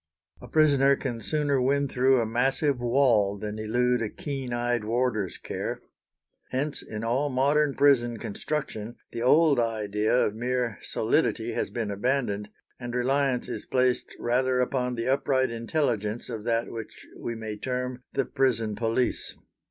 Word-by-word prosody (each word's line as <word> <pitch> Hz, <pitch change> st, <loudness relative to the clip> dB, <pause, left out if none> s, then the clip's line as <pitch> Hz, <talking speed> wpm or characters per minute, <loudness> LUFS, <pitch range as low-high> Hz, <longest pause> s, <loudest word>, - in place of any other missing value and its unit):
A -, -, -10 dB
prisoner 140 Hz, -3 st, +4 dB
can 120 Hz, -4 st, -4 dB
sooner 145 Hz, +1 st, +1 dB
win 140 Hz, +2 st, +2 dB
through 130 Hz, 0 st, +3 dB
a 115 Hz, -, +1 dB
massive 135 Hz, +4 st, +1 dB
wall 120 Hz, -5 st, +3 dB
than 105 Hz, +1 st, -5 dB
elude 125 Hz, +3 st, +1 dB
a 110 Hz, -, -1 dB
keen 135 Hz, -2 st, -5 dB
eyed 120 Hz, -1 st, 0 dB
warder's 110 Hz, -4 st, 0 dB
care. -, -, -4 dB, 0.7 s
Hence 140 Hz, +3 st, -2 dB
in 110 Hz, 0 st, -6 dB
all 130 Hz, +6 st, +1 dB
modern 140 Hz, +2 st, +2 dB
prison 120 Hz, -5 st, +4 dB
construction 120 Hz, -1 st, -4 dB, 0.2 s
the 115 Hz, -, -5 dB
old 145 Hz, +2 st, +5 dB
idea 110 Hz, 0 st, +1 dB
of 105 Hz, -, -1 dB
mere 120 Hz, -2 st, -2 dB
solidity -, -, 0 dB
has -, -, -2 dB
been 110 Hz, -4 st, -3 dB
abandoned, 105 Hz, -2 st, -1 dB, 0.3 s
and 120 Hz, -1 st, -5 dB
reliance 130 Hz, 0 st, +1 dB
is -, -, -6 dB
placed 125 Hz, -1 st, +1 dB
rather 125 Hz, +1 st, +1 dB
upon 125 Hz, -1 st, 0 dB
the 115 Hz, +1 st, -3 dB
upright 130 Hz, -1 st, +2 dB
intelligence 115 Hz, -3 st, -1 dB
of 110 Hz, -3 st, -5 dB
that 115 Hz, 0 st, 0 dB
which 115 Hz, -2 st, -8 dB
we 115 Hz, -, -5 dB
may 110 Hz, -1 st, -5 dB
term 125 Hz, +2 st, -3 dB
the 135 Hz, -, +1 dB
prison 115 Hz, -5 st, 0 dB
police. 115 Hz, +2 st, -1 dB
125 Hz, 150 wpm, -27 LUFS, 115-135 Hz, 0.7 s, old